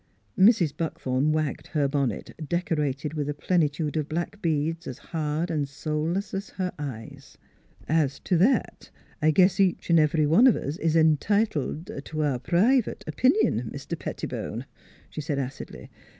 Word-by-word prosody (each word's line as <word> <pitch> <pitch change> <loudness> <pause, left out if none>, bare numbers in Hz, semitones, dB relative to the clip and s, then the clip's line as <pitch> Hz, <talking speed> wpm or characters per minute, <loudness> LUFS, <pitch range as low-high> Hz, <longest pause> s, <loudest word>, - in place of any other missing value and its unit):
Mrs. 190 - +4
Buckthorn 145 -3 -1
wagged 155 -2 -2
her 150 -3 +1
bonnet, 140 -2 -2 0.2
decorated 150 -4 -1
with 150 -2 -2
a 145 - -2
plenitude 150 -2 0
of 155 -1 -1
black 175 +6 -3
beads 160 +1 -1
as 125 - -6
hard 160 +1 -3
and 145 -3 -1
soul 150 +2 -2
less 195 +3 -3
as 195 +1 -4
her 185 -1 -3
eyes. 125 -7 -8 0.3
" - - -27 0.2
As 140 -1 -4
t' - - -3
that, 195 +10 +2 0.3
I 155 - +4
guess 185 +4 +4
each 185 -2 +1
an' 170 - +6
every 155 0 +3
one 170 - +6
of 245 - +5
us 145 +4 -4
is 160 0 0
en 160 -1 +5
titled 180 - -1
t' 155 +1 -6
our 145 -5 +1
private 210 - +2
o - - -2
pinion, 265 +12 +2
Mis - - -8
ter - - -3
Petti - - -5
bone," - - -5 0.5
she 155 - -5
said 145 -1 -2
acidly. 135 0 -6
155 Hz, 175 wpm, -26 LUFS, 145-180 Hz, 0.5 s, an